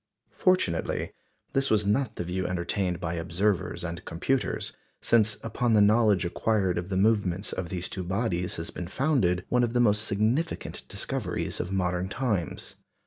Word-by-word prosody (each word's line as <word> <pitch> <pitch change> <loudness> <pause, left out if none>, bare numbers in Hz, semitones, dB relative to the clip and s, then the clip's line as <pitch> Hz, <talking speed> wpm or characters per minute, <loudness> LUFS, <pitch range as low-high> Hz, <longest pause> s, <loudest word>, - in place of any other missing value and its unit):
Fortunately, 180 - +1 0.4
this 135 0 +2
was 105 -2 +3
not 110 +2 +1
the - - -3
view 90 +2 -2
entertained 90 0 -1
by 85 -1 -3
observers 85 +4 0
and 85 +1 -5
computers; 125 +11 -1 0.2
since 110 -3 +3
upon 115 +1 0
the 110 - +6
knowledge 105 -2 +4
acquired 95 0 +1
of 90 +2 -6
the 95 - -1
movements 100 -2 +1
of 90 -2 -4
these 90 -1 -3
two 95 - -4
bodies 90 -1 -1
has 80 0 -5
been 90 - -6
founded 100 - +1
one 125 0 +3
of 120 -1 0
the 120 - +2
most 105 -3 +4
significant 115 +11 -1
discoveries - - -3
of 90 - -3
modern 90 -1 0
times. 105 - -2
100 Hz, 160 wpm, -27 LUFS, 90-115 Hz, 0.4 s, the